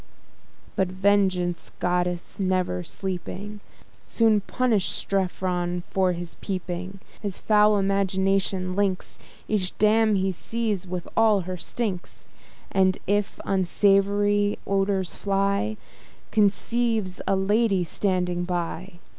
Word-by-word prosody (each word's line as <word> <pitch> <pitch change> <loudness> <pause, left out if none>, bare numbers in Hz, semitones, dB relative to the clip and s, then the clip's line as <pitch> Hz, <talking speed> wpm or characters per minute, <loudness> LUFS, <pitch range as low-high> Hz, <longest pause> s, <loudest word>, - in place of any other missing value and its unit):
But 190 - +2
Vengeance, 185 -2 +1
goddess 180 0 -1
never 185 - 0
sleeping, 195 - -5 0.4
Soon 220 -3 +3
punish'd 225 -2 +1
Strephon 180 -2 -1
for 185 -2 +2
his 175 0 -7
peeping: 185 0 -4 0.2
His 200 -3 -4
foul 210 -1 +4
imagination 195 -1 +1
links 195 -2 -1 0.3
Each 195 -4 -1
dame 215 0 +4
he 190 0 +1
sees 210 0 -2
with 180 -1 -5
all 220 -3 +4
her 185 +1 -5
stinks; 185 0 -4 0.4
And, 190 -1 +3
if 205 +1 0
unsavoury 200 +2 +2
odours 195 -2 0
fly, 200 +2 0 0.5
Conceives 215 -1 +1
a 195 - +3
lady 200 0 +2
standing 180 -1 -1
by. 175 +1 -3
195 Hz, 105 wpm, -25 LUFS, 185-205 Hz, 0.5 s, foul